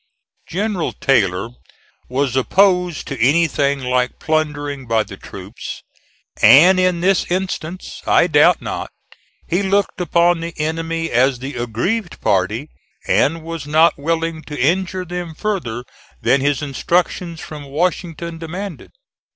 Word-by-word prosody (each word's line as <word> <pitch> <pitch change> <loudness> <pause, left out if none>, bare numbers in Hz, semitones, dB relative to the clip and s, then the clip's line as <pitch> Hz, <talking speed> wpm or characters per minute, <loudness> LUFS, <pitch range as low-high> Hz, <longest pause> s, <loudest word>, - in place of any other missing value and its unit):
General 195 -1 -2
Taylor 100 -6 +1 0.6
was 130 0 0
opposed 180 +4 +2
to 135 -4 -5
anything 140 0 +2
like 125 0 0
plundering 145 -3 -2
by 115 -1 +2
the - - -10
troops, - - -9 0.6
and 180 +6 +7
in 180 -2 +2
this 190 0 +2
instance, 185 -1 -4
I - - +5
doubt - - +4
not, - - -4 0.6
he 175 +3 +1
looked 200 -1 0
upon 175 0 +3
the 170 0 -6
enemy 165 +1 -2
as 130 +2 +3
the 135 +4 -6
aggrieved 125 - -2
party 105 +7 0 0.4
and 160 +3 +2
was 165 -3 -6
not 155 +2 +4
willing 165 +1 -1
to 150 - -7
injure 185 +6 0
them 175 -2 -5
further 155 - -3 0.4
than 135 - +2
his 145 +1 0
instructions 170 +3 -1
from 150 -3 -8
Washington 170 +2 -2
demanded. 175 +2 -7
160 Hz, 125 wpm, -19 LUFS, 140-175 Hz, 0.6 s, and